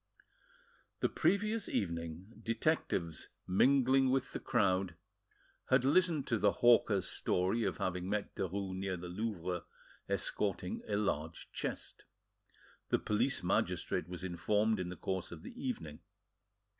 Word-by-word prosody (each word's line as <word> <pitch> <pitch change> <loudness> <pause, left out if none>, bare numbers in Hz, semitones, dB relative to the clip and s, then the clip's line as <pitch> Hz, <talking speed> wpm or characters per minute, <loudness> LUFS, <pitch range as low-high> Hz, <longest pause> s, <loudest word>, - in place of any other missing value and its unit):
The - - +3
previous 215 +2 +1
evening, 85 +2 -3
detectives, 115 - -1 0.2
mingling 130 +6 +4
with 130 0 0
the - - -3
crowd, 95 -7 +1 0.7
had 130 0 +4
listened 160 0 +3
to 115 -3 0
the 100 - +4
hawker's 115 -5 +4
story 95 +6 +1
of 95 -4 -1
having 90 0 -2
met 105 0 -2
Derues 95 +1 -3
near 95 -1 -2
the 90 0 -7
Louvre 90 -3 -3 0.5
escorting 95 -3 0
a 105 - 0
large 80 -6 -2
chest. - - -5 0.8
The - - +3
police 120 +4 +1
magistrate 90 -1 0
was 90 0 -6
informed 105 +5 +1
in 90 -1 -2
the 90 - -6
course 95 +2 -3
of 80 -2 -9
the - - -8
evening. 80 - -5
100 Hz, 130 wpm, -34 LUFS, 90-120 Hz, 0.8 s, mingling